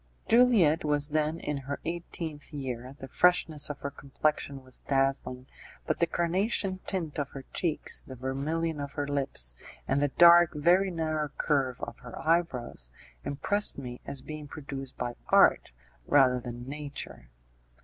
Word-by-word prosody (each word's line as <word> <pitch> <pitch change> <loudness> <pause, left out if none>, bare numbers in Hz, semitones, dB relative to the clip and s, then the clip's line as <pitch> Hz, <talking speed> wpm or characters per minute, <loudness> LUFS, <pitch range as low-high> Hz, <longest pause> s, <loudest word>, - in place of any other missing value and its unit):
Juliette 225 -10 +5
was 145 -1 +1
then 155 +2 0
in 150 -3 -3
her 140 +1 -5
eighteenth 165 -3 -5
year; 130 -2 -5
the 135 - -8
freshness 170 -1 +2
of 145 - -6
her 140 - -4
complexion 140 0 -2
was 130 -1 -8
dazzling, 135 -2 0 0.4
but - - -1
the 170 - +3
carnation 185 +3 0
tint 165 -6 -3
of 140 -1 -2
her 135 - -7
cheeks, 165 -4 0
the 130 - -10
vermilion 145 +5 -2
of 140 -1 -5
her 145 -1 -3
lips, 135 - +2 0.3
and 140 - +1
the 145 - +3
dark, 170 +3 +7
very 175 +6 +3
narrow 155 -3 -2
curve 135 -4 0
of - - -7
her 125 -1 -10
eyebrows, 155 - -1 0.3
impressed 205 +9 +3
me 125 -3 -7
as 140 - -4
being 155 -1 -7
produced 135 -3 -8
by 120 0 -3 0.2
art - - +5 0.4
rather 130 -3 +4
than 120 0 -7
nature. 140 - -7
145 Hz, 150 wpm, -29 LUFS, 135-165 Hz, 0.4 s, dark